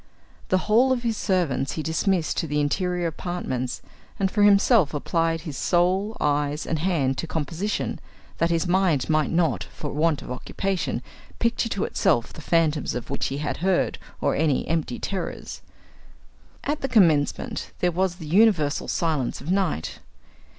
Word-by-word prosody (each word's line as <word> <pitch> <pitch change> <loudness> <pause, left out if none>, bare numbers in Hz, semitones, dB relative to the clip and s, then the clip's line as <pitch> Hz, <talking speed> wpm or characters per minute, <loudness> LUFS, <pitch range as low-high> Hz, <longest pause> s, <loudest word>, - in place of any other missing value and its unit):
The 185 - +4
whole 235 +5 +4
of 250 -2 0
his 230 -2 0
servants 175 -10 0
he 155 - -3
dismissed 165 +2 0
to 165 - 0
the 150 0 0
interior 180 +4 0
apartments, 160 -7 -3 0.4
and 190 -1 +1
for 210 - +1
himself 200 - +5
applied 165 +2 0
his 155 -4 -6
soul, 185 +5 +1
eyes, 145 +1 0
and 160 - -1
hand 150 -7 0
to 165 - -3
composition, 165 +7 -2 0.4
that 165 - +2
his 165 +1 +1
mind 175 -6 +2
might 155 -1 +2
not, 165 -1 +1
from 145 - -7
want 155 -1 +1
of - - -8
occupation, 185 +8 -2 0.3
picture 230 0 0
to 200 -2 -1
itself 150 - +1
the - - -10
phantoms 155 -4 +1
of 125 +2 -5
which 140 - -1
he 135 - -3
had 150 +1 -2
heard, 185 +1 +1 0.2
or - - +2
any 150 -2 +1
empty 160 -6 -1
terrors. 195 -2 -5 1.0
At 295 +1 -2
the 270 - -2
commencement 165 - +2
there 180 - +1
was 180 +1 0
the 170 -3 -9
universal 175 -4 +3
silence 155 -7 -1
of 165 - -4
night. 185 - -1
165 Hz, 160 wpm, -24 LUFS, 150-190 Hz, 1.0 s, himself